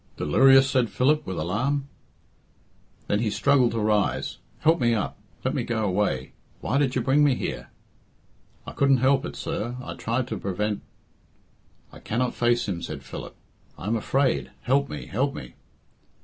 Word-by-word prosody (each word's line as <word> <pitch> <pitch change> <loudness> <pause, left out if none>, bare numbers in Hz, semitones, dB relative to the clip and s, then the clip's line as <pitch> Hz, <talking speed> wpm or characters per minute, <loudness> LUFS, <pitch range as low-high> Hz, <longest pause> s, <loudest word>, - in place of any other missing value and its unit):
"Delirious!" 135 - +5
said 130 -4 +1
Philip, 150 +3 +1
with 95 - -4
alarm. 130 - -1 1.2
Then 105 - 0
he 115 -1 0
struggled 130 +3 +3
to 115 - -1
rise. 105 -1 0 0.2
"Help 160 +2 +4
me 120 -1 +3
up. 105 - -2 0.3
Let 130 - +1
me 140 - 0
go 115 -2 -1
away. 90 -9 0 0.3
Why 140 - 0
did 135 -3 +1
you 125 - 0
bring 140 +4 +4
me 140 -3 +4
here?" - - -5 1.0
"I - - -7
couldn't 140 -1 +3
help 135 +4 +2
it, - - -8
sir. 160 -7 -3
I 125 - -6
tried 120 +2 -2
to - - -3
prevent 105 +2 -2 0.6
" - - -36
"I - - -11
cannot 125 +3 -1
face 120 -1 +1
him," 90 -4 -3
said 75 -4 -6
Philip. - - -8 0.4
"I - - -9
am 110 +3 +1
afraid. 130 +4 0
Help 140 +2 +2
me, - - -6
help 135 +6 -1
me." 65 -1 -8
125 Hz, 170 wpm, -25 LUFS, 105-135 Hz, 1.2 s, Delirious